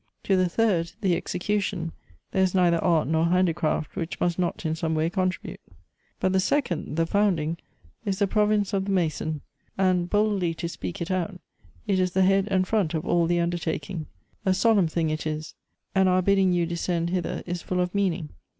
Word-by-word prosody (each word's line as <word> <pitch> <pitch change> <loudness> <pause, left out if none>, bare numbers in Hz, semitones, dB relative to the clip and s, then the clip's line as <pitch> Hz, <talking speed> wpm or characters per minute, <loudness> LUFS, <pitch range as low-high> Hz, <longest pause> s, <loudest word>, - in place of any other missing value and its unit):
" - - -48
To 195 - +2
the 185 -1 +2
third, 180 -5 +1
the 185 -4 +2
execution, 195 -3 -2 0.4
there 190 - +1
is 190 0 +2
neither 175 -2 +3
art 170 -4 +3
nor 160 +1 +2
handicraft 170 -4 +1
which 165 0 -4
must 175 0 0
not 175 -1 -1
in 160 - +1
some 160 0 -1
way 160 +2 +1
contribute. 185 0 -2 0.6
But 185 - +1
the 190 - +4
second, 185 - 0
the 165 0 +2
founding, 170 -4 +1 0.5
is 195 -2 -1
the 200 - +3
province 210 0 +1
of 195 -1 0
the 200 - -2
mason; 155 -4 -1 0.4
and, 185 -2 +2
boldly 205 -5 +1
to 170 - -3
speak 95 - -6
it 170 - -3
out, 185 0 -2 0.5
it 195 -3 +1
is 185 -1 +1
the 190 - +3
head 195 +1 +3
and 185 -1 +1
front 190 -7 +1
of 160 +2 -2
all 170 -2 +2
the 175 0 +2
undertaking 170 0 -2 0.2
— - - -40
a 190 -1 +2
solemn 200 -2 +4
thing 160 -1 0
it 155 0 -3
is 155 0 -4 0.2
— - - -53
and 190 0 +4
our 185 0 +3
bidding 195 -1 +3
you 175 -1 +2
descend 170 0 -1
hither 180 -2 -2
is 175 -1 -3
full 180 - -2
of 180 0 0
meaning. 185 -6 0
180 Hz, 205 wpm, -26 LUFS, 165-190 Hz, 0.6 s, the